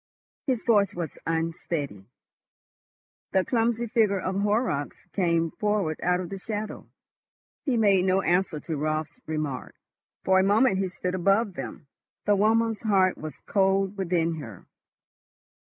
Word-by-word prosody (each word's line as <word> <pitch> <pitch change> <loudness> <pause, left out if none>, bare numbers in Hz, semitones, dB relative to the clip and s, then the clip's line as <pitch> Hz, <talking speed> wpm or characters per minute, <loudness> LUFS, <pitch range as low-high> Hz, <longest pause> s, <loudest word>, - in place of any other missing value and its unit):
His 255 -4 0
voice 205 -5 +3
was 170 -4 -5
unsteady. 160 - -2 1.3
The 190 -1 +3
clumsy 235 -1 +1
figure 215 -4 +2
of 190 +2 -1
Horrocks 205 - -1
came 170 -4 +1
forward 205 -7 -1
out 180 +1 +2
of 180 -2 -5
the 195 - -6
shadow. 210 +1 -5 0.8
He 260 -5 +1
made 200 -4 +4
no 190 +1 +2
answer 180 -3 +1
to 160 -3 -4
Raut's 155 - -2
remark. 155 -4 -3 0.5
For 190 0 +4
a - - +4
moment 205 +1 +3
he 195 - +1
stood 180 0 -4
above 195 +3 +2
them. 135 -2 -7 0.4
The 205 - +4
woman's 225 +2 +2
heart 195 -4 +3
was 155 -1 -8
cold 195 0 +2
within 170 -4 0
her. 115 - -10
190 Hz, 140 wpm, -26 LUFS, 165-210 Hz, 1.3 s, made